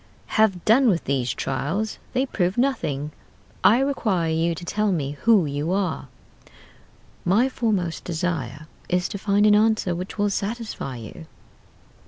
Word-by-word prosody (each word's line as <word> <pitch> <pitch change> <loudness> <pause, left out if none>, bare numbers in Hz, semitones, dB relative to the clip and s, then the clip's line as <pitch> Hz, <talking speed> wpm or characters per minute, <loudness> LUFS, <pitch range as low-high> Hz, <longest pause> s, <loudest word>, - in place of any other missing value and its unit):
"'Have 200 -5 +1
done 240 +3 +5
with 175 -5 +1
these 130 -3 0
trials: 150 - -2
they 260 +1 +1
prove 185 -6 -1
nothing. 150 - 0 0.5
I 225 - +6
require 210 -12 0
you 165 +1 +1
to 175 - -8
tell 210 +2 0
me 145 -6 -1
who 200 +5 +3
you 145 +3 -2
are.' 185 -8 -1 1.2
"'My 205 +8 +3
foremost 210 -10 -1
desire 160 -5 -3 0.2
is 180 0 +1
to 200 - -5
find 205 +1 +2
an 210 - +6
answer 215 -3 +3
which 180 +5 -6
will 205 -1 +1
satisfy 210 - -4
you. 120 +8 -10
185 Hz, 145 wpm, -24 LUFS, 160-215 Hz, 1.2 s, I